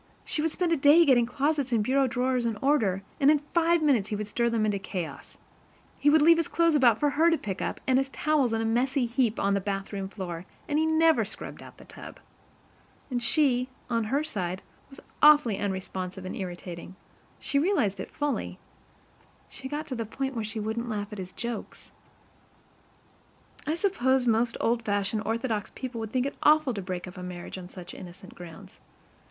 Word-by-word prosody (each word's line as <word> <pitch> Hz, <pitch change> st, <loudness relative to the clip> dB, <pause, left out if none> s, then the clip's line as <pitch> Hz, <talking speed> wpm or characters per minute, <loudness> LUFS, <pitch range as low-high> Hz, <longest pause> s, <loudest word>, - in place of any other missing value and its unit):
She 300 Hz, -, -1 dB
would 325 Hz, -, +1 dB
spend 345 Hz, +2 st, -1 dB
a 330 Hz, -, +3 dB
day 295 Hz, +5 st, +6 dB
getting 245 Hz, -5 st, +4 dB
closets 280 Hz, +1 st, 0 dB
and 225 Hz, -3 st, +2 dB
bureau 265 Hz, +4 st, +2 dB
drawers 250 Hz, 0 st, 0 dB
in 225 Hz, -2 st, -2 dB
order, 210 Hz, -8 st, +1 dB, 0.2 s
and 280 Hz, -, +5 dB
in 305 Hz, -, +6 dB, 0.2 s
five 335 Hz, -1 st, +3 dB
minutes 245 Hz, -9 st, +2 dB
he 210 Hz, -, -2 dB
would 210 Hz, +1 st, -3 dB
stir 235 Hz, +3 st, 0 dB
them 225 Hz, -2 st, +1 dB
into 205 Hz, -2 st, 0 dB
chaos. 180 Hz, -7 st, -6 dB, 0.6 s
He 290 Hz, -, +4 dB
would 305 Hz, 0 st, +5 dB
leave 335 Hz, +1 st, +7 dB
his 335 Hz, -, 0 dB
clothes 335 Hz, -1 st, +2 dB
about 250 Hz, -7 st, +5 dB
for 295 Hz, -1 st, +2 dB
her 315 Hz, +4 st, +4 dB
to 330 Hz, -, +2 dB
pick 195 Hz, -7 st, -5 dB
up, -, -, -3 dB
and 260 Hz, 0 st, +3 dB
his 270 Hz, 0 st, -1 dB
towels 285 Hz, -3 st, +1 dB
in 225 Hz, 0 st, 0 dB
a -, -, -1 dB
messy 250 Hz, +3 st, +1 dB
heap 235 Hz, -2 st, 0 dB
on 200 Hz, -, +2 dB
the 200 Hz, -, +1 dB
bathroom 195 Hz, 0 st, -4 dB
floor, 180 Hz, -3 st, -6 dB, 0.2 s
and 295 Hz, 0 st, +1 dB
he 315 Hz, -, +2 dB
never 320 Hz, -6 st, +4 dB
scrubbed 215 Hz, -, -7 dB
out -, -, -13 dB
the -, -, -14 dB
tub. -, -, -11 dB, 0.9 s
And 245 Hz, -1 st, -1 dB
she, 255 Hz, -1 st, +2 dB, 0.2 s
on 230 Hz, -1 st, +1 dB
her 275 Hz, +7 st, 0 dB
side, 185 Hz, -, -3 dB, 0.3 s
was 270 Hz, -, -13 dB, 0.2 s
awfully 295 Hz, -8 st, +6 dB
unresponsive 190 Hz, -1 st, -4 dB
and 185 Hz, -, -5 dB
irritating, 180 Hz, -1 st, -7 dB, 0.4 s
she 280 Hz, -, 0 dB
realized 260 Hz, -, +1 dB
it -, -, -5 dB
fully, 290 Hz, -1 st, -3 dB, 0.9 s
she 265 Hz, -, -8 dB
got 300 Hz, +2 st, -4 dB
to 265 Hz, -, -5 dB
the 230 Hz, -, -2 dB
point 265 Hz, +5 st, -4 dB
where 230 Hz, -3 st, -3 dB
she 220 Hz, +1 st, -5 dB
wouldn't 220 Hz, +3 st, -3 dB
laugh 210 Hz, -1 st, -4 dB
at 210 Hz, -, -7 dB
his 185 Hz, -1 st, -6 dB
jokes. 235 Hz, +2 st, -7 dB, 1.8 s
I 310 Hz, -, +1 dB
suppose 265 Hz, -9 st, +1 dB
most 230 Hz, 0 st, +1 dB
old 235 Hz, +1 st, +1 dB
fashioned, 205 Hz, 0 st, -1 dB
orthodox 225 Hz, -2 st, -1 dB
people 255 Hz, -3 st, -5 dB
would 220 Hz, -1 st, -5 dB
think 255 Hz, 0 st, 0 dB
it 280 Hz, -, -3 dB
awful 300 Hz, -3 st, +4 dB
to 200 Hz, -, -4 dB
break 180 Hz, -1 st, -5 dB
up 180 Hz, -, -10 dB
a -, -, -7 dB
marriage 180 Hz, +1 st, -7 dB
on 180 Hz, -1 st, -10 dB
such 180 Hz, -2 st, -10 dB
innocent 185 Hz, +2 st, -11 dB
grounds. 170 Hz, -2 st, -12 dB
235 Hz, 200 wpm, -27 LUFS, 200-285 Hz, 1.8 s, leave